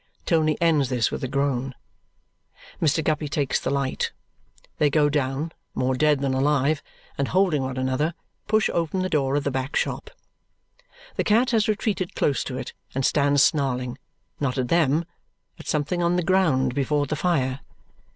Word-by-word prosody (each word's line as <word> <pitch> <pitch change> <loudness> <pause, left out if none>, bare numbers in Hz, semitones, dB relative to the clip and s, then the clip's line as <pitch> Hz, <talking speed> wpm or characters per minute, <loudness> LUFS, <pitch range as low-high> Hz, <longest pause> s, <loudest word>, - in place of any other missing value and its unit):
Tony 155 -2 +2
ends 155 -6 +3
this 125 -3 +1
with - - -4
a - - 0
groan. 135 -1 -1 1.1
Mr. 160 0 +2
Guppy 150 0 0
takes 145 -2 0
the - - -3
light. 140 -1 -1 0.7
They 150 - +4
go 145 0 +3
down, 145 +2 -1 0.2
more 130 +1 +1
dead 145 +1 +2
than 135 -1 0
alive, 140 +2 +2 0.4
and 140 - +1
holding 180 -6 +2
one 130 0 -3
another, 130 +6 0 0.3
push 215 -1 +3
open 170 +2 0
the 185 - -1
door 140 -4 +1
of 145 - +1
the 140 - -1
back 130 +2 -3
shop. - - -1 1.1
The - - +2
cat 235 +4 +3
has 220 -3 +2
retreated 210 -4 -1
close 140 - +1
to 130 - -4
it - - -6 0.2
and 135 0 0
stands 140 -1 +3
snarling, 130 -3 0 0.4
not 140 -2 -1
at 125 -2 -1
them, 165 -1 +2 0.5
at - - -11
something 150 +4 0
on 170 +1 +2
the 180 - +1
ground 160 -9 +2
before 145 +1 +1
the 155 - -2
fire. 140 -6 0
145 Hz, 170 wpm, -24 LUFS, 135-165 Hz, 1.1 s, They